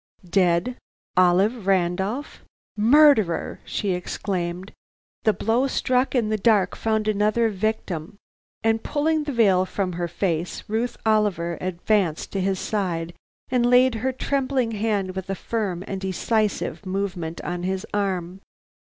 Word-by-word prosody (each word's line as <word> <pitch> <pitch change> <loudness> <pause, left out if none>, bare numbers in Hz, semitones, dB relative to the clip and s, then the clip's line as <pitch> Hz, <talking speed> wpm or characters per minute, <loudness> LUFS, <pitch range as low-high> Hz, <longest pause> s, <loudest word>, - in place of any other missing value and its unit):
"Dead, 180 +6 +2 0.4
Olive 190 +4 +3
Randolph? 190 - 0 0.3
Murderer!" 220 - +4
she 200 - -2
exclaimed. 180 0 -3 0.5
"The 215 - +6
blow 235 +6 +1
struck 255 0 +1
in 230 -4 +2
the 215 0 0
dark 200 -3 +3
found 220 -1 0
another 215 +2 +2
victim!" 200 -4 -3 0.5
And 225 0 +2
pulling 310 +1 0
the 290 - -2
veil 200 -7 +4
from 185 -1 -2
her 175 0 -2
face, 170 0 -2
Ruth 230 +3 -2
Oliver 205 -6 +1
advanced 180 -1 0
to 195 - -1
his 190 0 0
side 175 -5 -2 0.4
and 250 -1 +2
laid 250 +1 +5
her 260 - +1
trembling 260 -2 -1
hand 205 -3 -1
with 190 0 -5
a 195 - -1
firm 195 -5 -3
and 195 -2 -5
decisive 210 +3 -1
movement 185 -4 -3
on 175 0 -4
his 185 +1 -2
arm. 190 -2 -2
200 Hz, 135 wpm, -24 LUFS, 180-225 Hz, 0.5 s, The